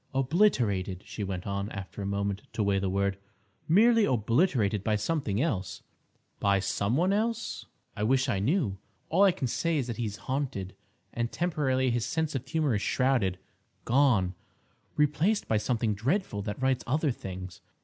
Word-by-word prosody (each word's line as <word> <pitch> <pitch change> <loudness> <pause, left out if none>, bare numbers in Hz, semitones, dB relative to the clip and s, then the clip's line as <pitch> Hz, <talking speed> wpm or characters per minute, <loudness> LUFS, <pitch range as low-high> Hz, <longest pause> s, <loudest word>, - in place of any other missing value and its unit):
"Obliterated," 120 - +1
she 105 - -5
went 95 -2 -4
on, 100 +1 -2
after 100 +1 -7
a 100 - -3
moment 100 0 -1
to 110 - 0
weigh 100 -1 +2
the 95 -1 -1
word, 100 0 0 0.5
"merely 225 +6 +5
obliterated 115 - +2
by 110 0 +1
something 105 -2 -1
else—" 110 - -2 0.6
"By 100 -1 +3
some 100 +5 0
one 185 +4 +2
else?" 225 +2 -2 0.3
"I - - -5
wish 130 +5 +2
I 115 -7 0
knew. 110 - 0 0.3
All 175 +5 +2
I 200 -1 +7
can 140 - -3
say 165 +7 0
is 135 - 0
that 120 -2 -5
he 120 - -1
is 105 -1 -4
haunted, 130 -9 -2 0.4
and 120 0 -2
temporarily 135 -7 0
his 120 -1 0
sense 160 -1 -1
of 135 -1 -4
humour 150 -2 +1
is 105 - 0
shrouded—gone—replaced 130 - 0
by 110 - +2
something 115 0 0
dreadful 120 - -1
that 105 +3 -5
writes 130 -1 +1
other 150 +2 +1
things. 95 -5 -7
120 Hz, 160 wpm, -29 LUFS, 100-150 Hz, 0.6 s, I